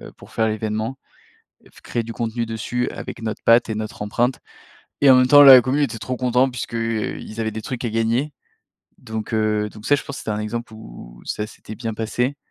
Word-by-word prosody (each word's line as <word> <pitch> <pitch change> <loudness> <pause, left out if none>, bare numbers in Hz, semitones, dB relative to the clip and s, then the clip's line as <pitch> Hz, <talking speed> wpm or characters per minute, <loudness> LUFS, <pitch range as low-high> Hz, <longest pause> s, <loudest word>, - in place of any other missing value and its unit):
heu, - - -10
pour - - -16
faire 110 0 +1
l'événement, 110 +4 -3 0.7
heu, - - -20
f - - -18
créer 120 - -2
du 115 - -6
contenu 115 0 -2
dessus 115 +2 -2
avec 115 - -8
notre 110 -1 -4
patte 115 0 +5
et 110 - -1
notre 110 -1 -5
empreinte 120 +4 0 0.6
et 140 - +7
même 130 0 +6
temps 145 +2 +9
la 135 -3 +11
commu 135 +3 0
était 130 -5 -1
trop 125 +3 -4
contente 125 +1 +2
puisque, 120 -1 -6
heu, 115 -1 -2
ils 110 - -10
avaient 110 -1 -1
des 110 - -5
trucs 125 -1 -5
à 120 - -1
gagner, 115 +6 0 0.7
donc, 110 -2 -6
heu, 105 -1 +1
donc 105 +1 -13
ça, - - +3
je - - -4
pense 140 - -7
que - - -6
c'était 110 - -3
un 105 - -2
exemple, 110 +1 -5
où - - -12
où - - -20
ça 105 - -3
s'était 110 0 -11
bien 115 -1 -4
passé, 125 +5 -1
115 Hz, 230 wpm, -21 LUFS, 110-125 Hz, 0.7 s, la